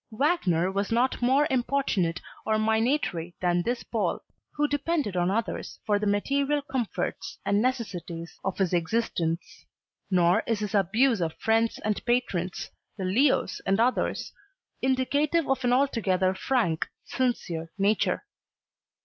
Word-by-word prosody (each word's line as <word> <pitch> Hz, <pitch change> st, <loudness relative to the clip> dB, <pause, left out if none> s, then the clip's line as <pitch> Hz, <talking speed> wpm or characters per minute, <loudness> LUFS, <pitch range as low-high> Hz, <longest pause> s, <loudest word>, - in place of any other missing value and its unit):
Wagner 215 Hz, -, +1 dB
was 200 Hz, +2 st, -2 dB
not 245 Hz, +3 st, +1 dB
more 265 Hz, +4 st, +4 dB
importunate 240 Hz, -10 st, +1 dB, 0.2 s
or 220 Hz, -, +1 dB
minatory 220 Hz, -, 0 dB
than 175 Hz, -1 st, +2 dB
this 240 Hz, +6 st, -2 dB
Pole, 225 Hz, -3 st, -1 dB, 0.3 s
who 295 Hz, 0 st, +1 dB
depended 290 Hz, -, -1 dB
on 175 Hz, 0 st, +2 dB
others 220 Hz, +3 st, -2 dB
for 205 Hz, -1 st, +2 dB
the 210 Hz, -, -1 dB
material 280 Hz, +8 st, +1 dB
comforts 260 Hz, -6 st, -3 dB
and 200 Hz, +1 st, +2 dB
necessities 180 Hz, -9 st, -3 dB
of 195 Hz, -, -2 dB
his 190 Hz, -2 st, +1 dB
existence. 170 Hz, -2 st, -1 dB, 0.4 s
Nor 180 Hz, -2 st, +4 dB
is 225 Hz, -, +1 dB
his 210 Hz, 0 st, -4 dB
abuse 215 Hz, +4 st, +3 dB
of 160 Hz, -2 st, -1 dB
friends 225 Hz, 0 st, +1 dB
and 215 Hz, -1 st, -1 dB
patrons, 195 Hz, -7 st, -1 dB, 0.3 s
the 190 Hz, -, -3 dB
Leos 260 Hz, +10 st, +2 dB
and 195 Hz, +2 st, +1 dB
others, 245 Hz, +2 st, 0 dB, 0.5 s
indicative 285 Hz, +5 st, +1 dB
of 265 Hz, -1 st, 0 dB
an 245 Hz, -, +2 dB
altogether 200 Hz, -8 st, +2 dB
frank, 190 Hz, -6 st, 0 dB, 0.2 s
sincere 170 Hz, -11 st, -2 dB
nature. 205 Hz, +2 st, +1 dB
220 Hz, 130 wpm, -27 LUFS, 185-260 Hz, 0.5 s, more